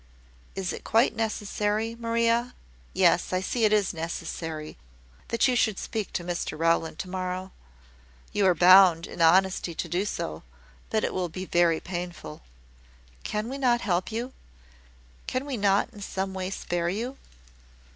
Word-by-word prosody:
"Is 190 -2 -2
it - - -8
quite 230 +1 +3
necessary, 215 0 -1
Maria 230 +1 0 0.4
yes, - - +3
I 185 - +1
see 220 +5 0
it 210 - +3
is 205 -3 +2
necessary 160 -1 -5 0.5
that 230 +2 +2
you 255 - +2
should 220 -4 +2
speak 220 -3 -4
to 175 - -2
Mr 175 -3 -3
Rowland 165 0 +1
to 195 -1 -5
morrow? 185 0 -4 0.8
You 200 -2 +3
are 180 - +4
bound 180 -1 +7
in 170 - -7
honesty 180 0 +3
to 170 - -3
do 175 +4 -1
so; 80 - -4 0.5
but 220 - 0
it - - -1
will 180 -2 -1
be 185 +3 -6
very 170 -2 +3
painful. 175 - -6 0.8
Can 210 +1 -2
we 270 +3 -5
not 240 -3 +2
help 180 +1 -1
you? 240 +4 -4 0.9
Can 255 +2 -2
we 280 -3 -3
not 200 +2 +2
in 205 - -11
some 190 -1 -3
way 185 -1 -3
spare 175 -3 -2
you?" 235 +8 -4
190 Hz, 155 wpm, -27 LUFS, 175-225 Hz, 0.9 s, bound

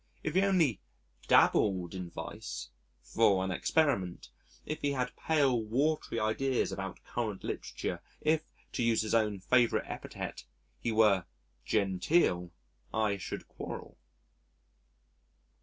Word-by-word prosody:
If 155 - -2
he 190 - +4
only 175 - +3 0.5
dabbled 95 -4 +4
in 90 -2 -5
vice - - -6 0.3
(for 100 - +3
an 95 - -2
experiment), 100 - +1 0.4
if 155 - -4
he 145 -1 +1
had 125 -2 -2
pale, 140 -7 +2
watery 135 +3 0
ideas 125 +4 +1
about 95 -1 -5
current 110 -5 -3
literature - - -4 0.2
if 155 0 +2 0.3
to - - -2
use 115 -2 +3
his 110 - -2
own 105 -3 +2
favourite 120 +4 +3
epithet - - -6 0.4
he 115 - -1
were 105 -5 +4 0.4
genteel, 95 - +2 0.4
I 105 -2 +1
should 95 - -6
quarrel. - - -7
110 Hz, 120 wpm, -31 LUFS, 95-140 Hz, 0.5 s, he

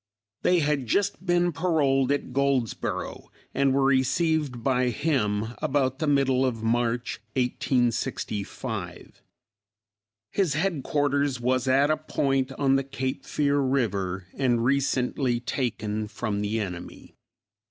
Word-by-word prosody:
They 180 -2 +3
had 145 -4 0
just 200 - 0
been 175 0 +3
paroled 145 -5 +2
at 140 -3 -2
Goldsboro, 135 -4 -1 0.2
and 140 0 +2
were 135 +1 +2
received 135 0 +1
by 125 -1 +2
him 110 -5 0
about 135 -1 0
the 155 - -1
middle 135 -2 +3
of 115 -4 -1
March, 120 +1 0 0.2
1865. 125 -4 -2 1.1
His 180 -8 +1
headquarters 145 -5 0
was 130 +1 0
at 140 +3 +4
a 155 - +2
point 135 -3 0
on 135 0 +2
the 135 - 0
Cape 130 -1 -4
Fear 145 -1 +1
river 100 -9 0
and 120 -3 +1
recently 130 -2 +1
taken 110 -4 -2
from 105 -2 -3
the 105 +2 -1
enemy. 90 -4 -7
130 Hz, 120 wpm, -26 LUFS, 120-145 Hz, 1.1 s, at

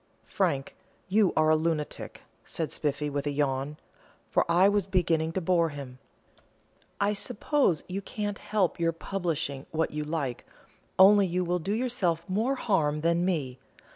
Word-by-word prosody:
"Frank, 135 -1 -1 0.3
you 205 0 +4
are 155 0 +4
a - - +6
lunatic," 155 -1 -3 0.2
said 160 -2 -4
Spiffy, 150 0 -2
with 145 0 -3
a - - 0
yawn, 140 0 -1 0.5
for - - +2
I 180 +3 +6
was 205 -2 +1
beginning 165 -4 +1
to 190 - -1
bore 170 -1 +2
him. 135 -3 -9 1.0
"I 200 +1 +2
suppose 205 - 0
I 185 +2 -3
can't 205 0 -4
help 205 -6 0
your 165 0 +1
publishing 165 -6 -3
what 160 0 -1
you 150 0 -3
like, 150 -5 -3 0.5
only 195 +1 +7
you 180 +1 0
will 175 +1 0
do 190 +4 -3
yourself 205 -9 -1
more 225 +8 0
harm 155 - 0
than 170 +2 +2
me. 140 -9 -2
170 Hz, 155 wpm, -28 LUFS, 150-195 Hz, 1.0 s, only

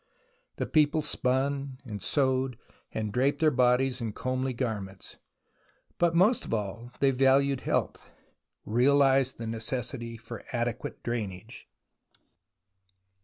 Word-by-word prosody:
The - - -2
people 155 0 +3
spun 135 0 -1
and 105 -4 -6
sewed 130 -3 +1 0.3
and 110 -2 -3
draped 135 +3 +1
their 155 -1 +4
bodies 125 0 +2
in 110 -2 -3
comely 130 +2 -2
garments. 105 -6 -5 0.8
But 170 -1 +3
most 205 +8 +4
of - - -7
all 105 +3 -5
they 135 -1 +5
valued 135 +1 +3
health, - - -2 0.6
reaUzed 135 +2 +3
the 115 - -5
necessity 115 +1 -4
for 115 0 -9
adequate 120 -1 -3
drainage. 110 -2 -5
130 Hz, 115 wpm, -28 LUFS, 115-135 Hz, 0.8 s, they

